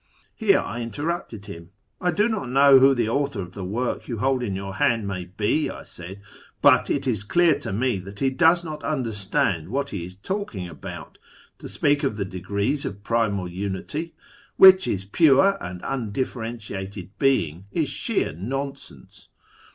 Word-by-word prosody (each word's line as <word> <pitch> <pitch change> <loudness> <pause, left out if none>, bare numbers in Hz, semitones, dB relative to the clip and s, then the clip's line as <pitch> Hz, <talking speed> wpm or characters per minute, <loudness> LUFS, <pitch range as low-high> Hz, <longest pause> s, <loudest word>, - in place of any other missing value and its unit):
Here 210 -4 +3
I 120 - -4
interrupted 135 - -4
him. 85 -4 -10 0.2
' 105 +3 -42
I 180 - +1
do 205 +6 +2
not 215 - -3
know 135 +1 +7
who 135 +1 +6
the 120 -3 0
author 140 -1 -1
of 90 -1 -6
the 100 - -6
work 115 +7 -3
you 120 - -4
hold 130 +3 +1
in 105 -6 -2
your 95 0 -5
hand 115 -3 +2
may 95 -2 -4
be,' 105 - 0
I - - -8
said 95 +3 -10 0.2
' - - -27
but - - +5
it - - 0
is 110 -6 0
clear 165 +5 +3
to 145 - -5
me 120 +1 0
that 100 +2 -10
he 135 -1 +1
does 170 +4 +4
not 155 -2 -7
understand 100 - -1
what 140 +4 -2
he 95 -4 -4
is 90 +1 -9
talking 105 - -4
about. 80 -3 -9 0.4
To - - -8
speak 145 0 +2
of 105 - -1
the 100 - -2
degrees 100 +9 -2
of 100 +1 -6
Primal 105 -5 0
Unity, 100 - -5 0.4
which 190 0 +8
is 95 -1 -2
Pure 160 - +4
and 90 0 -7
Undifi'erentiated 110 -6 -4
Being, 95 - +1
is - - 0
sheer - - -1
nonsense.' 105 - -7
115 Hz, 175 wpm, -24 LUFS, 95-140 Hz, 0.4 s, which